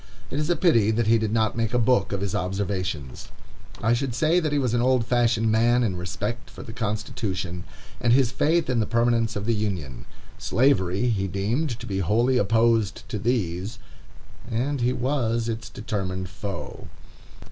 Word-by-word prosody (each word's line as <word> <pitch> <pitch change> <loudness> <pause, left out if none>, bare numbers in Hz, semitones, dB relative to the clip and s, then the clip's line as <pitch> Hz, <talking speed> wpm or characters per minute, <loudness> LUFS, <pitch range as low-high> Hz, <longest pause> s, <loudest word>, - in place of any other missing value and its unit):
It 140 - -2
is 150 +2 -1
a 175 - +3
pity 115 - +3
that 115 +1 +1
he 115 +1 +4
did 110 -1 -1
not 110 -1 +1
make 115 0 -1
a - - +4
book 120 -3 +2
of 100 -1 -2
his 100 -2 -2
observations. 90 -7 -3 0.6
I 115 - +3
should 125 0 -1
say 155 +7 +3
that 155 -3 -1
he 145 - +1
was 130 -4 0
an 120 - +2
old 125 -1 +2
fashioned 115 -2 +2
man 120 +2 +3
in 100 -6 0
respect 95 +7 -4
for - - -10
the 110 - -9
Constitution, 105 -5 -3 0.3
and 120 - +2
his 125 -1 +4
faith 160 +5 +1
in 125 -2 +1
the 110 - 0
permanence 115 -1 +1
of 105 0 -3
this 115 0 +1
Union. 90 - -4 0.3
Slavery 115 -4 +2
he 100 -4 0
deemed 115 - -1
to 120 - -7
be 95 -4 -2
wholly 115 +8 +2
opposed 110 0 +2
to 105 - -3
these, 100 -3 -1 0.7
and 130 +4 -1
he 120 +1 +2
was 120 -3 0
its 115 +1 -4
determined 95 -4 -4
foe. 100 -1 -7
115 Hz, 180 wpm, -25 LUFS, 100-120 Hz, 0.7 s, he